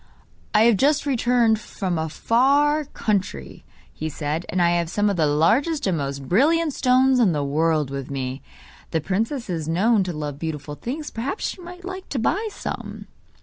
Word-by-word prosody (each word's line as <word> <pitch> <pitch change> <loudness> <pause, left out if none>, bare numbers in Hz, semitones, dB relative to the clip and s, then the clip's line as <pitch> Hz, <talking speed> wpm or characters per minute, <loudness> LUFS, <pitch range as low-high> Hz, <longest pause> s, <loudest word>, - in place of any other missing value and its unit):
'I 210 - +6
have 230 -3 +5
just 290 +5 +2
returned 240 -4 +2
from 185 -5 -3
a 160 0 -2
far 285 - +2
country,' 190 - -3 0.3
he 155 - -4
said, 155 +2 -3
'and 185 - -1
I 170 -1 +4
have 170 -1 0
some 205 +3 +1
of - - -2
the 160 -3 +2
largest 245 - +2
and 185 - +1
most 140 -1 -4
brilliant 305 - +3
stones 260 0 +3
in 205 -8 +4
the 145 -1 -1
world 150 0 +1
with 135 -1 -5
me. 135 -1 -4 0.5
The 160 - 0
princess 225 - -2
is 165 -5 -3
known 200 +6 +3
to 180 - -3
love 150 -2 -5
beautiful 150 -2 -5
things, 280 - -5
perhaps 255 - -3
she 370 - -8
might 355 +1 -10
like 375 0 -7
to 280 - -3
buy 400 - 0
some? - - -6
200 Hz, 185 wpm, -23 LUFS, -, 0.5 s, I